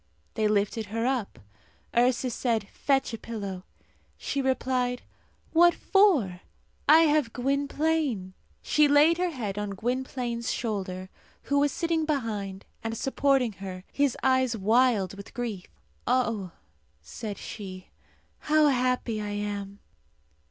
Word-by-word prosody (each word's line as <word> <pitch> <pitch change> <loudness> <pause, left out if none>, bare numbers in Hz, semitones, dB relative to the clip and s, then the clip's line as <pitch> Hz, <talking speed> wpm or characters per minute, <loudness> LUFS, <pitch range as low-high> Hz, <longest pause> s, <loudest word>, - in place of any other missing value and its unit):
They 215 - +1
lifted 210 +1 0
her 225 +3 -2
up. 255 -5 -1 0.6
Ursus 245 +1 +2
said, 225 -5 0
"Fetch 270 -3 0
a 225 - -4
pillow." 200 -5 -6 0.5
She 280 - -2
replied, 255 -2 0 0.5
"What 345 +1 +6
for? 295 - +3 0.5
I 315 +2 +9
have 300 -7 +2
Gwynplaine!" 280 -5 0 0.3
She 300 -1 +4
laid 300 +4 +5
her 360 0 +1
head 215 - -4
on 205 -1 -3
Gwynplaine's 245 +1 -2
shoulder, 190 -5 -3 0.3
who 285 0 +1
was 290 0 +3
sitting 330 0 0
behind, 215 -10 -3 0.2
and 225 0 -3
supporting 270 -1 +2
her, 185 -2 -6
his 285 -3 +1
eyes 260 -3 +2
wild 220 -2 +3
with 200 0 -11
grief. 225 -7 -4 0.4
"Oh," 230 -6 +1 0.5
said 205 - -6
she, 185 -3 -8 0.5
"how 305 0 +4
happy 250 -4 0
I 210 - -4
am!" 205 -1 -4
240 Hz, 125 wpm, -27 LUFS, 205-275 Hz, 0.6 s, I